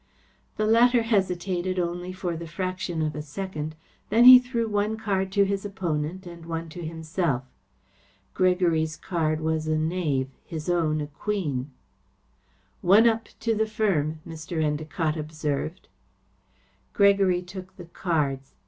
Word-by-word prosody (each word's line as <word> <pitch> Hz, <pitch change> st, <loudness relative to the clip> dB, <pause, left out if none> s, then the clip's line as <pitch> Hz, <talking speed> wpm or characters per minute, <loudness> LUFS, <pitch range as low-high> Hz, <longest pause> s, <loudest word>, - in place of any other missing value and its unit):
The 215 Hz, -, +1 dB
latter 235 Hz, +2 st, +5 dB
hesitated 185 Hz, -4 st, 0 dB
only 175 Hz, +1 st, -2 dB
for 185 Hz, -2 st, -3 dB
the 165 Hz, +1 st, -6 dB
fraction 180 Hz, -1 st, -3 dB
of 155 Hz, -1 st, -1 dB
a 150 Hz, -, -4 dB
second. 155 Hz, 0 st, -5 dB, 0.3 s
Then 225 Hz, +3 st, +5 dB
he 255 Hz, 0 st, +12 dB
threw 245 Hz, -2 st, -2 dB
one 210 Hz, +1 st, 0 dB
card 195 Hz, -3 st, -1 dB
to 200 Hz, -1 st, +4 dB
his 195 Hz, 0 st, -2 dB
opponent 185 Hz, -3 st, -3 dB
and 170 Hz, -1 st, -10 dB
one 165 Hz, 0 st, -4 dB
to 175 Hz, +2 st, -8 dB
himself. 160 Hz, -4 st, -2 dB, 0.9 s
Gregory's 170 Hz, -4 st, +2 dB
card 160 Hz, -3 st, -1 dB
was 160 Hz, 0 st, -1 dB
a 155 Hz, 0 st, +1 dB
knave; 155 Hz, -5 st, 0 dB
his 160 Hz, 0 st, -6 dB
own 155 Hz, -3 st, +1 dB
a -, -, -2 dB
queen. 150 Hz, -5 st, -3 dB, 1.1 s
"One 205 Hz, +6 st, +6 dB
up 225 Hz, 0 st, +1 dB
to 230 Hz, 0 st, +1 dB
the 220 Hz, 0 st, +1 dB
firm," 175 Hz, -9 st, 0 dB
Mr. 160 Hz, +1 st, -6 dB
Endacott 155 Hz, +1 st, -1 dB
observed. 155 Hz, +2 st, -3 dB, 1.1 s
Gregory 195 Hz, -3 st, +4 dB
took 185 Hz, +1 st, -10 dB
the 175 Hz, -, -9 dB
cards. 150 Hz, -6 st, -2 dB
175 Hz, 140 wpm, -26 LUFS, 155-195 Hz, 1.1 s, he